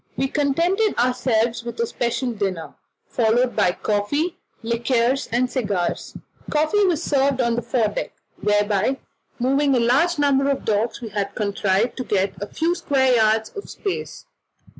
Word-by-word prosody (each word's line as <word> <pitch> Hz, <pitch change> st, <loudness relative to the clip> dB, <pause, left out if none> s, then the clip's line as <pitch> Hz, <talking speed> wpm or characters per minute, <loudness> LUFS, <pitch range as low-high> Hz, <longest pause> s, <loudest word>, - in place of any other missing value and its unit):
We 270 Hz, -, +1 dB
contented 340 Hz, +10 st, +1 dB
ourselves 240 Hz, -2 st, +1 dB
with 235 Hz, -1 st, -7 dB
a 235 Hz, -, +2 dB
special 240 Hz, +2 st, -2 dB
dinner, 195 Hz, -7 st, -3 dB, 0.3 s
followed 240 Hz, +2 st, +1 dB
by 190 Hz, -4 st, +3 dB
coffee, 285 Hz, -, 0 dB, 0.3 s
liqueurs, 235 Hz, +3 st, 0 dB
and 245 Hz, +2 st, +2 dB
cigars. 205 Hz, -8 st, -2 dB, 0.3 s
Coffee 310 Hz, +8 st, +2 dB
was 345 Hz, -3 st, +1 dB
served 275 Hz, -3 st, +1 dB
on 235 Hz, -2 st, +2 dB
the 240 Hz, -, -1 dB
fore 230 Hz, -2 st, 0 dB
deck, 205 Hz, -, -4 dB, 0.3 s
where 205 Hz, 0 st, +2 dB
by 210 Hz, +6 st, 0 dB, 0.4 s
moving 275 Hz, +2 st, +2 dB
a 250 Hz, +7 st, +3 dB
number 280 Hz, -1 st, +2 dB
of 275 Hz, -, -1 dB
the -, -, +1 dB
dogs 220 Hz, +4 st, -1 dB
we 230 Hz, -, -6 dB
had 205 Hz, -1 st, -3 dB
contrived 200 Hz, +1 st, 0 dB
to 255 Hz, -, -2 dB
get 195 Hz, -4 st, 0 dB
a 205 Hz, -, -3 dB
few 330 Hz, +8 st, 0 dB
square 265 Hz, -6 st, +2 dB
yards 220 Hz, -1 st, +2 dB
of 405 Hz, -, -7 dB
space. 395 Hz, -3 st, -5 dB
240 Hz, 160 wpm, -22 LUFS, 215-275 Hz, 0.4 s, by